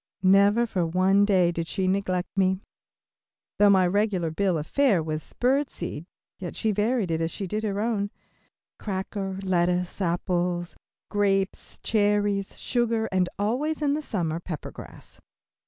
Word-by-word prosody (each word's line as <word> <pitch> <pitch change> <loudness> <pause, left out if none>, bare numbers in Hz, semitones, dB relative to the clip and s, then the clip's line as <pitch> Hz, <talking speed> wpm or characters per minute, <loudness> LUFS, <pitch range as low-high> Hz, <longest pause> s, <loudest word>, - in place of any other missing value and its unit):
Never 200 +5 +5
for 190 -6 -1
one 185 +4 +3
day 185 -4 +3
did 165 -1 -3
she 190 +2 -1
neglect 185 -1 -1
me. 190 +1 +1 1.0
Though 205 0 +7
my 190 -2 +5
regular 185 -3 +1
bill 185 +1 +1
of 150 - -3
fare 230 - +2
was 155 0 -5
bird 270 +3 +2
seed, 170 -1 -6 0.3
yet 180 -3 -6
she 220 - +1
varied 210 -2 0
it 160 0 0
as 165 - 0
she 195 - -4
did 210 +4 -2
her 205 -2 -1
own. 210 -2 0 0.7
Cracker, 195 -1 -4
lettuce, 180 0 0
apples, 175 0 -1 0.4
grapes, 195 -2 0
cherries, 205 -2 +1
sugar, 230 -2 0
and 185 -1 +1
always 255 +10 -1
in 290 -2 +1
the 305 - -1
summer, 170 - -2
pepper 170 -3 -6
grass. - - -12
195 Hz, 150 wpm, -26 LUFS, 175-210 Hz, 1.0 s, Though